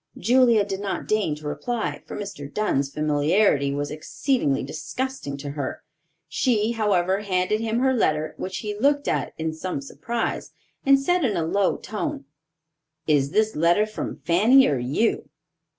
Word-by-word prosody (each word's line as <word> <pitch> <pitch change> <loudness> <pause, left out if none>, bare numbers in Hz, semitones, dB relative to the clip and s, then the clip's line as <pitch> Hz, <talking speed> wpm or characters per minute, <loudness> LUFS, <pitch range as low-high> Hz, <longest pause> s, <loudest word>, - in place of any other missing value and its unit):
Julia 235 -3 +4
did 195 -1 -4
not 200 -1 -4
deign 210 -8 +1
to 150 0 -8
reply, 235 +9 -3
for - - -6
Mr. 195 -9 -7
Dunn's 140 -10 0
familiarity 150 0 +2
was 145 +1 -3
exceedingly 155 - -1
disgusting 155 - -4
to 140 0 -6
her. 140 -2 -5 0.4
She, 225 -4 +1
however, 195 -4 +1
handed 195 +1 0
him 225 0 -1
her 265 0 +3
letter, 155 -9 0
which 185 0 -4
he 210 0 -3
looked 285 +6 +1
at - - -1
in 160 0 -2
some 180 - -4
surprise, 235 -4 -4 0.3
and 275 0 +7
said 355 +6 +1
in 215 -8 +1
a 165 - 0
low 195 +3 +1
tone, 210 -9 -4 0.8
"Is 145 -3 +2
this 215 +6 +1
letter 170 +7 +3
from 215 - -5
Fanny, 220 - +6
or 140 -4 0
you?" 140 - 0
195 Hz, 155 wpm, -24 LUFS, 150-225 Hz, 0.8 s, and